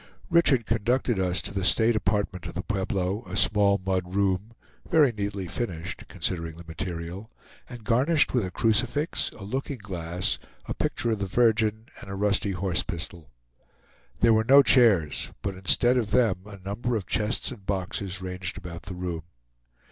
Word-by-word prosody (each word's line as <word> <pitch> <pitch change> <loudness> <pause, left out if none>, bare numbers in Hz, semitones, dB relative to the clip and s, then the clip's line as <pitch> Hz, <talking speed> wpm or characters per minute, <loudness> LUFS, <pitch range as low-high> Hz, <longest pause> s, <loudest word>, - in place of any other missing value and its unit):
Richard 145 -8 +4
conducted 115 +1 +1
us 90 0 0
to 100 - -4
the 95 -1 -2
state 110 +4 +4
apartment 100 -4 -1
of - - -9
the 90 - -3
Pueblo, 95 -1 -1
a 95 +1 -4
small 100 -1 +4
mud 95 -1 -1
room, 100 +2 0 0.4
very 150 -6 +5
neatly 100 -3 -3
finished, 90 -3 -5
considering 85 -3 -3
the 85 - -10
material, 85 +4 -5 0.4
and 120 -3 -9
garnished 135 +8 +3
with 125 -4 +2
a 95 - -3
crucifix, 120 - 0
a 100 - -10
looking 130 +6 -3
glass, 90 -4 -3 0.3
a - - -3
picture 120 - -1
of 110 - -1
the 100 - -2
Virgin, 110 0 +2 0.2
and - - -10
a 95 - -4
rusty 100 0 +1
horse 90 -1 0
pistol. 85 -2 -7 0.9
There 115 -1 +6
were 110 0 +3
no 140 +4 +7
chairs, 105 - +4
but 100 - -2
instead 110 +7 +2
of 115 -4 0
them 115 -4 +3
a 100 -1 -9
number 105 +6 -3
of 105 -4 -2
chests 110 +6 -1
and 115 -6 -10
boxes 95 -1 -3
ranged 90 0 -4
about 85 -3 -8
the 95 - -5
room. 90 -2 -4
100 Hz, 170 wpm, -26 LUFS, 90-115 Hz, 0.9 s, no